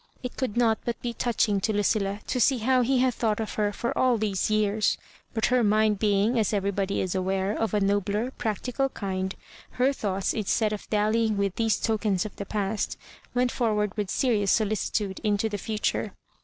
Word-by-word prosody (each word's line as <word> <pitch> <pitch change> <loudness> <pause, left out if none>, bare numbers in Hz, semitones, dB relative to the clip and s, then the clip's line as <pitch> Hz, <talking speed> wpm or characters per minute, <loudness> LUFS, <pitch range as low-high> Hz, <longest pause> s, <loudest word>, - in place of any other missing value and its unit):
It 250 - -5
could 255 -4 -2
not 225 -3 +3
but 235 - -3
be 240 -1 -2
touching 220 -4 +1
to 220 - 0
Lucilla 205 -1 0
to 250 - -1
see 265 +3 +4
how 255 +3 +2
he 260 +2 +2
had 255 -1 +3
thought 220 -2 0
of 220 - -3
her 210 -1 0
for 235 +3 -3
all 255 -2 +3
these 205 -3 0
years; 215 0 +2 0.4
but 220 - +2
her 250 -1 +4
mind 215 -1 +3
being, 210 +3 +2
as 215 -1 +1
everybody 200 -1 0
is 185 - -2
aware, 190 +2 0
of 225 -1 -1
a - - +3
nobler, 205 +4 0
practi 235 +1 -3
cal 270 -1 +2
kind, 190 -4 -3 0.4
her 255 +2 +3
tl'oughts, 195 -8 -1
instead 215 0 +1
of 210 - -7
dallyirig 215 +1 +2
with 200 -2 0
these 225 -1 +1
tokens 215 -4 0
of 215 - -7
the 200 - -5
past, 205 0 -2 0.4
went 245 0 +2
forward 210 -4 0
with 205 -3 -2
serious 210 -6 +1
solicitude 210 -2 0
into 210 0 +1
the 205 -1 -4
future. 215 +2 -2
215 Hz, 195 wpm, -26 LUFS, 200-230 Hz, 0.4 s, see